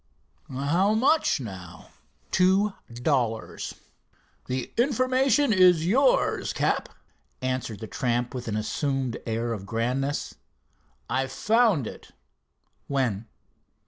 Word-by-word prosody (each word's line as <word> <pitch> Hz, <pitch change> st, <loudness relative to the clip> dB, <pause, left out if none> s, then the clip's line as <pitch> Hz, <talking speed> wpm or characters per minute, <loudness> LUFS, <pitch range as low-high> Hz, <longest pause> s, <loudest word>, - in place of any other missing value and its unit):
"How 165 Hz, +11 st, +1 dB
much 275 Hz, -, +3 dB
now?" 95 Hz, -7 st, -9 dB, 0.4 s
"Two 190 Hz, +3 st, +3 dB, 0.2 s
dollars." 120 Hz, -3 st, -1 dB, 0.7 s
"The 130 Hz, 0 st, -3 dB
information 255 Hz, 0 st, +2 dB
is 180 Hz, -4 st, +5 dB
yours, 260 Hz, +9 st, +2 dB
Cap," -, -, 0 dB, 0.5 s
answered 130 Hz, -5 st, -3 dB
the -, -, -4 dB
tramp, 120 Hz, +2 st, -1 dB
with 125 Hz, -2 st, -6 dB
an 105 Hz, -1 st, -1 dB
assumed 130 Hz, +2 st, -1 dB
air 115 Hz, +1 st, -1 dB
of 100 Hz, -3 st, -7 dB
grandness. 125 Hz, +6 st, -1 dB, 0.7 s
"I 135 Hz, +1 st, 0 dB
found 210 Hz, -, +2 dB
it." -, -, -10 dB, 0.7 s
"When?" 120 Hz, -6 st, -1 dB
135 Hz, 100 wpm, -26 LUFS, -, 0.7 s, is